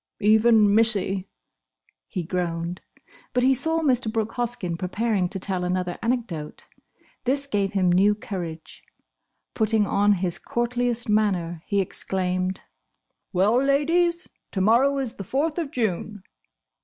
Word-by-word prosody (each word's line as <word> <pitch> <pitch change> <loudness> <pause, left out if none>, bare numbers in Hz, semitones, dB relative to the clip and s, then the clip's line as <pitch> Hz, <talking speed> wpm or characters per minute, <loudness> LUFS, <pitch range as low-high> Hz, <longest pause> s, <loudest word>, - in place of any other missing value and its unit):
"Even 215 0 +5
Missie!" 200 -4 +2 0.8
he 180 - -4
groaned. 170 0 -3 0.5
But 250 -1 +2
he 265 +1 +5
saw 320 +5 0
Mr. 255 -6 +1
Brooke 225 -1 -1
Hoskyn 235 -8 -2
preparing 190 +2 -1
to 190 - -2
tell 185 -1 -2
another 180 0 -2
anecdote. 225 -11 -3 0.6
This 275 +3 0
gave 205 -6 -1
him 185 -3 +2
new 200 +4 +4
courage. 175 -6 -7 0.7
Putting 220 -1 +2
on 205 +1 +3
his 180 -2 -2
courtliest 240 0 -1
manner, 185 -6 0
he 200 - +1
exclaimed, 185 0 -2 0.7
"Well, 200 +5 +3
Ladies! 335 +5 +2 0.3
To 195 - -1
morrow 245 +8 +4
is 260 -4 -2
the 195 - -5
Fourth 295 - -1
of 320 -4 -3
June!" 210 - -3
210 Hz, 130 wpm, -24 LUFS, 185-245 Hz, 0.8 s, Even